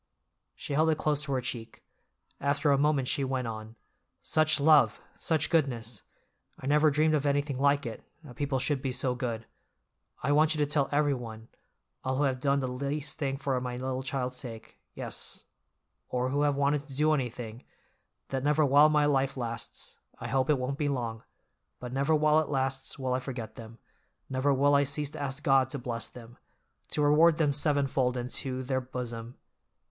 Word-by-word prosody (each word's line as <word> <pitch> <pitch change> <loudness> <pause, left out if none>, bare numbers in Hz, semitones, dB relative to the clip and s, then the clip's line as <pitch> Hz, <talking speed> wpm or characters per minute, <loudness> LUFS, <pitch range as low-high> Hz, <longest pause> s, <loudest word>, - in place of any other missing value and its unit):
She 140 - -6
held 155 +3 +3
it 155 - +2
close 150 -2 +1
to 140 - -4
her 130 - 0
cheek. 120 -2 -6 0.6
After 145 +1 +1
a 140 - +4
moment 145 -3 +2
she 140 +1 +1
went 130 -1 -1
on. 110 0 -7 0.4
"Such 155 0 +2
love, 145 -6 +5 0.2
such 160 -2 0
goodness! 120 - 0 0.6
I - - -9
never 150 +2 +4
dreamed 155 +2 +2
of 145 -1 +1
anything 140 -1 0
like 140 +1 +3
it, 115 - -6 0.2
that 130 -5 -12
people 145 -2 -1
should 135 +1 0
be 135 - -2
so 125 0 0
good. 120 -3 -4 0.8
I 140 - +1
want 155 +2 +4
you - - -4
to 150 - +2
tell 145 -1 +1
everyone—all 130 -2 -3
who 145 - +2
have 130 -2 0
done 140 0 +2
the 130 - -1
least 140 +3 -3
thing 135 -3 -1
for 135 -2 -1
my 125 -1 -4
little 130 0 -2
child's 130 -1 -3
sake, 115 -3 -8 0.2
yes, - - -4 0.7
or 125 0 0
who 140 +2 0
have 145 -1 +2
wanted 140 +1 +1
to 135 - -9
do 155 +2 +3
anything, 125 -4 -4 0.7
that 135 -1 -2
never 150 +1 +3
while 145 +2 +6
my 150 -1 +3
life 135 -2 +1
lasts—I 115 -2 -6
hope 135 0 +1
it 150 - +4
won't 130 +2 -3
be 145 -2 +1
long—but 120 0 -7
never 140 +4 +2
while 155 0 +4
it 155 - -2
lasts 135 -1 -1
will 130 -2 -1
I 130 - +1
forget 125 -4 -6
them, 115 0 -11 0.5
never 130 +2 +2
will 140 +1 +3
I 140 0 +5
cease 145 +1 -1
to - - -6
ask 140 +1 -3
God 135 -2 +4
to 140 - -3
bless 120 -3 -4
them, 120 0 -13 0.5
'to 150 - 0
reward 155 +2 +5
them 150 -3 +2
sevenfold 135 -3 +1
into 130 +1 -3
their 130 0 -1
bosom. 120 -2 -6
135 Hz, 185 wpm, -29 LUFS, 125-145 Hz, 0.8 s, while